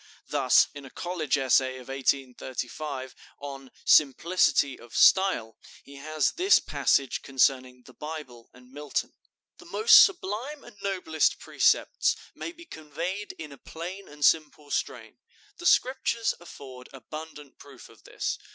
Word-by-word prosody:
Thus, 135 -4 +4
in 145 - -10
a 135 - -11
college 160 -2 -2
essay 130 -1 +2
of 125 - -12
1835, 130 0 -3 0.2
on 135 -2 -9 0.2
"Simplicity 145 -1 +3
of 120 - -14
Style," 190 - +3 0.2
he 140 0 -13
has 155 +2 0
this 375 +4 +4
passage 135 -2 0
concerning 130 -2 0
the 130 - -16
Bible 150 -7 -9
and 125 0 -19
Milton: 145 0 -4 0.5
"The - - -14
most 445 +1 +7
sublime 280 - -3
and 240 - -14
noblest 180 -6 0
precepts - - +1 0.2
may - - -6
be 340 0 -15
conveyed 170 - -6
in 155 -2 -9
a 140 - -13
plain 180 +4 -8
and 150 -1 -2
simple 150 -2 +1
strain. - - -4 0.4
The 350 - -2
Scriptures 250 -5 +2
afford 130 -7 -12
abundant 150 +2 -10
proof 135 -3 -14
of 115 -5 -20
this. - - -4
145 Hz, 135 wpm, -27 LUFS, 130-180 Hz, 0.5 s, most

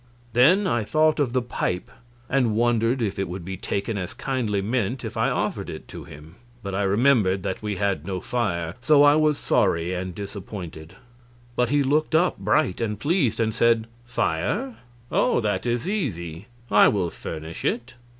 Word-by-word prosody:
Then 165 - +5
I 120 -11 +1
thought 155 +6 +2
of 140 -5 +1
the 130 -1 0
pipe, 90 -6 -3 0.4
and 125 -5 +1
wondered 120 +1 +2
if 100 -2 -2
it 95 - -2
would 90 -1 -6
be 95 +1 -4
taken 100 +3 -3
as 90 +4 -5
kindly 120 -6 -1
meant 115 +3 -1
if - - -6
I - - +2
offered - - -2
it - - -8
to - - -8
him. 75 +5 -13 0.3
But 100 -1 -4
I 95 - 0
remembered 100 -2 +3
that 95 - -3
we 105 -1 -2
had 100 -5 -1
no 95 +1 -3
fire, 95 -7 -2
so 145 +3 +5
I 145 0 +7
was 155 -1 +3
sorry 85 +2 +1
and 90 -1 -4
disappointed. 95 -5 -8 0.6
But 125 0 +1
he 145 +1 +3
looked 155 +4 +1
up 175 - +2
bright 100 0 +1
and 105 -3 -2
pleased, 140 - +1
and 110 -1 +1
said: 115 -1 +3 0.2
"Fire? 155 - -1 0.3
Oh, - - +2
that 110 +1 -1
is 120 +3 -1
easy; 95 - -3 0.2
I 105 - +7
will 90 -5 0
furnish 80 +1 -7
it." 120 +2 -1
110 Hz, 180 wpm, -24 LUFS, 95-130 Hz, 0.6 s, I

